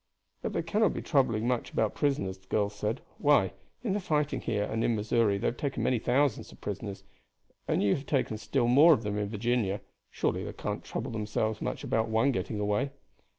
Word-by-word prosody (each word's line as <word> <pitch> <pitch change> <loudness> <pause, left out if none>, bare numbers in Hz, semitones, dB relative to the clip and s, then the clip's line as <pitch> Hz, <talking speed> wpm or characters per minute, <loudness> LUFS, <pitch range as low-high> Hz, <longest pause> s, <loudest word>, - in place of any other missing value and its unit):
"But - - -3
they - - 0
cannot 215 -1 +2
be - - -4
troubling 120 -6 +2
much 125 -2 0
about 110 -2 +1
prisoners," 100 -10 0
the 95 - -29
girl 100 +1 +1
said. 105 +3 -3 0.2
"Why, 145 -11 +4 0.3
in 215 -6 0
the 205 - 0
fighting 150 -6 0
here 105 - 0
and 110 +2 -1
in 120 - +2
Missouri 105 -1 +2
they - - -4
have 120 - 0
taken 140 -2 -2
many 125 -2 +2
thousands 130 +2 +1
of - - -15
prisoners, 100 -1 -5 0.6
and - - +1
you 100 - +4
have 140 - -4
taken 125 -6 0
still 120 +4 0
more 145 +7 +8
of 115 - 0
them 105 0 -2
in 105 -1 -2
Virginia; 110 -2 0 0.3
surely - - -1
they - - -5
cannot - - -4
trouble 120 +2 -4
themselves 110 0 -1
much - - -3
about 115 0 0
one 115 +5 +3
getting 110 -4 -2
away." 105 +6 +1
115 Hz, 205 wpm, -29 LUFS, 105-135 Hz, 0.6 s, more